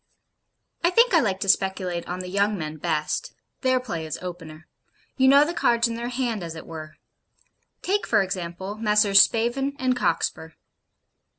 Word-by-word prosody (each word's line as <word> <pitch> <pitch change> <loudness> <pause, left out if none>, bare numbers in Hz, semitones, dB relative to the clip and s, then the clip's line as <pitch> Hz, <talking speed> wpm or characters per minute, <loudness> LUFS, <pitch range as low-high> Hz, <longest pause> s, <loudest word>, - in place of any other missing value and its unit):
I 345 - +4
think 465 +4 +4
I 335 - +6
like 195 -9 -1
to 200 - -2
speculate 190 -3 0
on 180 +1 -4
the 180 - -8
young 200 +2 0
men 155 -2 -5
best. 150 0 -2 0.3
Their 255 -1 +2
play 190 -10 -5
is 155 - -5
opener. 170 -3 -9 0.5
You 265 -1 +3
know 280 +2 +7
the 335 - -3
cards 235 -6 +2
in 230 - -4
their 235 +1 -4
hand, 240 -4 -2
as 165 -1 -6
it 160 - -9
were. 155 -1 -9 0.9
Take, 405 +2 0
for 200 - +3
example, 185 +2 -5
Messrs. 210 -2 +5
Spavin 255 +5 +1
and 255 -1 0
Cockspur. 160 -4 -1
200 Hz, 170 wpm, -24 LUFS, 170-250 Hz, 0.9 s, know